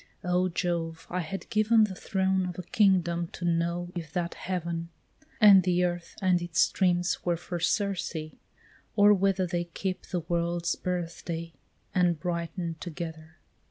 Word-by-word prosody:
O 180 0 +1
Jove, 165 -2 -2
I 180 - -1
had 180 +3 -5
given 220 0 +4
The 205 -3 0
throne 190 0 0
of 180 - -6
a 180 - -5
kingdom 175 -3 +2
to 175 - -5
know 170 +1 0
if 165 -4 -6
that 175 -2 -1
heaven, 170 -2 -3 0.5
And 205 -4 +9
the 180 0 +2
earth 175 -1 -2
and 180 -2 +3
its 175 -2 -2
streams 180 -1 +2
were 175 - +1 0.2
of 175 -2 -2
Circe, 200 -4 0 0.8
or 205 0 +7
whether 195 -1 +2
They 175 0 -2
kept 185 +2 -4
the 180 -2 0
world's 170 +1 -1
birthday 170 -2 -4 0.4
and 175 -3 +2
brighten'd 170 -1 -3
together! 160 -1 -7
175 Hz, 150 wpm, -28 LUFS, 170-185 Hz, 0.8 s, And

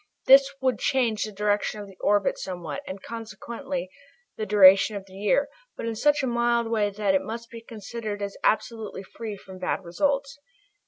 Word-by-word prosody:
This 275 +1 +7
would 255 -4 +1
change 240 -6 +1
the 215 - -7
direction 210 +1 0
of 205 - -6
the 195 -1 -14
orbit 205 -1 +2
somewhat, 175 -6 -5
and 190 0 -7
consequently 230 +3 -6 0.5
the 215 - -4
duration 195 +1 +7
of 200 -1 -6
the 190 - -17
year, 205 +8 +1 0.3
but - - -5
in 230 - -2
such 295 +5 +2
a - - +1
mild 235 -1 +1
way 210 -2 +2
that 200 -1 0
it 190 - +3
must 230 +1 -7
be 230 -1 -9
considered 220 -1 -6
as 200 -1 -4
absolutely 215 -2 -1
free 215 +1 -7
from 190 -1 -12
bad 190 +1 -2
results. 275 +9 -1
215 Hz, 180 wpm, -26 LUFS, 200-235 Hz, 0.5 s, This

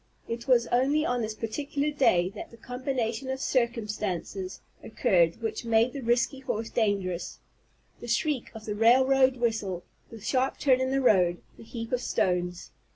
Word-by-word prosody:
It 235 +3 -5
was 245 -2 +4
only 280 +5 +2
on 245 -3 0
this 215 -1 -3
particular 280 +6 -2
day 185 -11 +3
that 205 - -9
the 230 - -15
combination 250 0 -3
of 265 0 -2
circumstances 210 -7 -2 0.2
occurred 180 -1 +1
which 225 - -3
made 230 +1 +2
the 275 - -5
risky 240 +3 +1
horse 225 -4 -4
dangerous, 195 -6 -1 0.6
the 240 - -9
shriek 260 +2 0
of 220 -1 -9
the 210 - -3
railroad 260 +4 +4
whistle, 215 -7 -1 0.3
the 225 - -10
sharp 260 +5 0
turn 260 -2 +3
in 260 - 0
the 270 +1 +1
road, 180 -8 +3
the - - -13
heap 230 0 -7
of 250 -1 0
stones. 180 -3 -1
235 Hz, 160 wpm, -28 LUFS, 210-260 Hz, 0.6 s, was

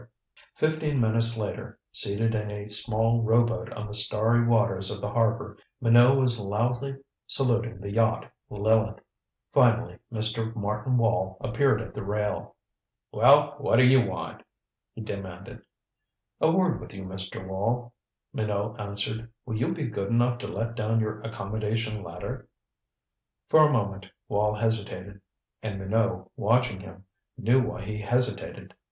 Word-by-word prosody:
Fifteen 155 -2 0
minutes 115 0 +2
later, 105 -2 -5
seated 110 +3 +4
in 105 -1 -2
a 105 0 -6
small 115 +2 +2
rowboat 115 0 +1
on 105 - -6
the 105 - -8
starry 110 +3 +4
waters 95 -5 +2
of 105 -1 -4
the 105 +1 -4
harbor, 115 +1 0 0.2
Minot 120 +2 +6
was 125 -3 +2
loudly 120 +7 -1 0.3
saluting 120 -4 0
the 100 +1 -6
yacht 110 +1 +1 0.2
Lileth. 110 +1 +1 0.5
Finally 120 0 +3
Mr. 110 0 -2
Martin 105 +4 -1
Wall 95 -5 +1
appeared 115 -1 +1
at - - -11
the - - -5
rail. 105 +1 -3 0.6
"Well 145 +1 +5
what 140 - +2
d'you 130 +1 +6
want?" - - -5 0.5
he 115 - -7
demanded. 100 -4 -7 0.8
"A 160 - +4
word 185 0 +1
with - - -11
you, 95 - -7
Mr. 95 0 -7
Wall," 115 +6 -2 0.4
Minot 105 +1 -2
answered. 105 +3 -4
"Will 115 -3 -3
you 125 +9 0
be 170 -3 -3
good 100 -6 -3
enough 120 +1 +2
to - - -5
let 115 +2 -3
down 115 0 0
your 110 -1 -2
accommodation 110 0 -3
ladder?" 85 -1 -7 1.0
For 155 -1 +7
a - - -1
moment 100 -6 -1 0.2
Wall 105 +1 +1
hesitated. 100 -3 -3 0.4
And 110 -3 -4
Minot, 95 -1 -1
watching 115 -1 +1
him, 95 0 -12 0.3
knew 125 +2 +3
why 105 -4 -4
he 105 +1 -4
hesitated. 120 +4 -2
110 Hz, 140 wpm, -27 LUFS, 105-120 Hz, 1.0 s, For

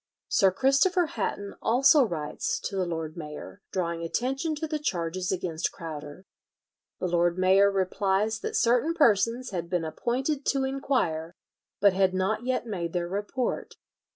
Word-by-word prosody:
Sir 195 - +4
Christopher 275 - +3
Hatton 205 -6 -3
also 270 +5 +5
writes 155 -9 -2
to 200 - -4
the 185 -2 0
lord 160 -2 -4
mayor, 155 +4 -8
drawing 170 -3 -2
attention 270 - -1
to 310 +2 -3
the 305 -1 -3
charges 180 - -2
against 175 -3 -2
Crowder. 155 +1 -8 0.7
The - - -2
lord 175 0 +1
mayor 190 +2 +5
replies 195 +3 0
that - - -4
certain 250 +8 +2
persons 235 - +2
had 170 -3 -4
been 175 -2 0
appointed 260 - -2
to 275 -1 +2
inquire, 255 - -1 0.4
but 200 -1 +5
had 190 0 +2
not 195 +5 0
yet 255 -2 0
made 175 -7 -4
their 175 -1 -1
report. 205 +7 -3
195 Hz, 150 wpm, -27 LUFS, 175-255 Hz, 0.7 s, also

